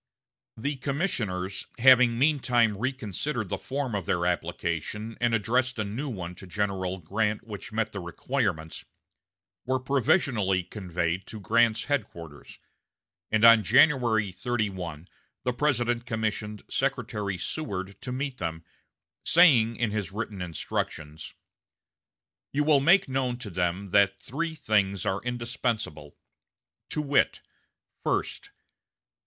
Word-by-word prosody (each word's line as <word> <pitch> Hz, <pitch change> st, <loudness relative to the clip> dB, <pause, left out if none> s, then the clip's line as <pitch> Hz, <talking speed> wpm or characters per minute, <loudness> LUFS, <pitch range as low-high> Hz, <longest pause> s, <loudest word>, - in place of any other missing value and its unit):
The 140 Hz, +5 st, -2 dB
commissioners 115 Hz, -, -2 dB
having 125 Hz, -1 st, +6 dB
meantime 125 Hz, -6 st, +3 dB
reconsidered 120 Hz, 0 st, -3 dB
the -, -, -2 dB
form 135 Hz, -3 st, -3 dB
of 100 Hz, -4 st, -3 dB
their 85 Hz, 0 st, +1 dB
application 90 Hz, +5 st, -2 dB
and 120 Hz, -1 st, +3 dB
addressed 125 Hz, +4 st, +1 dB
a 110 Hz, -, 0 dB
new 115 Hz, +9 st, -4 dB
one 90 Hz, -7 st, -5 dB
to 95 Hz, -, -11 dB
General 95 Hz, -1 st, -2 dB
Grant 105 Hz, +5 st, -1 dB
which 110 Hz, +1 st, -8 dB
met 110 Hz, 0 st, -1 dB
the 100 Hz, -, -5 dB
requirements, 85 Hz, -, -2 dB, 0.8 s
were 130 Hz, +1 st, 0 dB
provisionally 125 Hz, -, +2 dB
conveyed 90 Hz, -2 st, -3 dB
to 110 Hz, -, -8 dB
Grant's 115 Hz, +3 st, +3 dB
headquarters; 85 Hz, -, -4 dB, 0.7 s
and 110 Hz, +1 st, +4 dB
on 115 Hz, -1 st, +9 dB
January 120 Hz, -3 st, +4 dB
31 95 Hz, -7 st, -3 dB, 0.4 s
the 125 Hz, -, 0 dB
President 120 Hz, -3 st, 0 dB
commissioned 110 Hz, -2 st, -3 dB
Secretary 100 Hz, -3 st, -1 dB
Seward 100 Hz, -, -4 dB
to 125 Hz, -, -5 dB
meet 130 Hz, 0 st, -3 dB
them, 80 Hz, -1 st, -4 dB, 0.6 s
saying 125 Hz, -10 st, +5 dB
in 115 Hz, -2 st, 0 dB
his 105 Hz, -4 st, -3 dB
written 105 Hz, -2 st, -5 dB
instructions: 80 Hz, -2 st, -4 dB, 1.2 s
"You 145 Hz, +2 st, +1 dB
will 150 Hz, -2 st, +5 dB
make 180 Hz, +7 st, +5 dB
known 130 Hz, -2 st, -1 dB
to 110 Hz, -5 st, -8 dB
them 90 Hz, +2 st, -1 dB
that 100 Hz, -1 st, +4 dB
three 160 Hz, -, -3 dB
things 105 Hz, -, +1 dB
are 95 Hz, +1 st, 0 dB
indispensable, 115 Hz, -, -3 dB, 0.7 s
to 150 Hz, -, -1 dB
wit: 140 Hz, -1 st, +2 dB, 0.6 s
First. -, -, -2 dB
110 Hz, 120 wpm, -27 LUFS, 95-125 Hz, 1.2 s, on